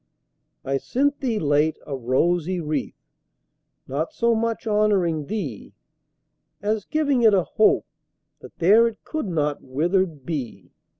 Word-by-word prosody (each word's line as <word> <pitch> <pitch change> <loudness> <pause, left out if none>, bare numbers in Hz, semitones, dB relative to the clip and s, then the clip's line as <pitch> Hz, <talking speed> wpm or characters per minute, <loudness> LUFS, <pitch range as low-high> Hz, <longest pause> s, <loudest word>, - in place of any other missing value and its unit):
I 135 +1 0
sent 280 - 0
thee, 240 -5 -1
late, 150 -1 +2
a 140 - -4
rosy 170 +8 0
wreath, 150 -3 -3 0.9
Not 145 +5 -3
so 235 0 +2
much 230 +1 -1
honouring 200 -8 +1
thee, 165 - -5 0.9
As 210 +1 -1
giving 290 -5 +1
it 220 -3 +6
a 185 - +3
hope, 215 - +2 0.5
that - - -14
there 215 +7 +5
It 225 -2 -7
could 310 -8 -4
not 150 -4 -1
withered 160 +2 -1
be. 120 - -5
175 Hz, 130 wpm, -23 LUFS, 145-220 Hz, 0.9 s, it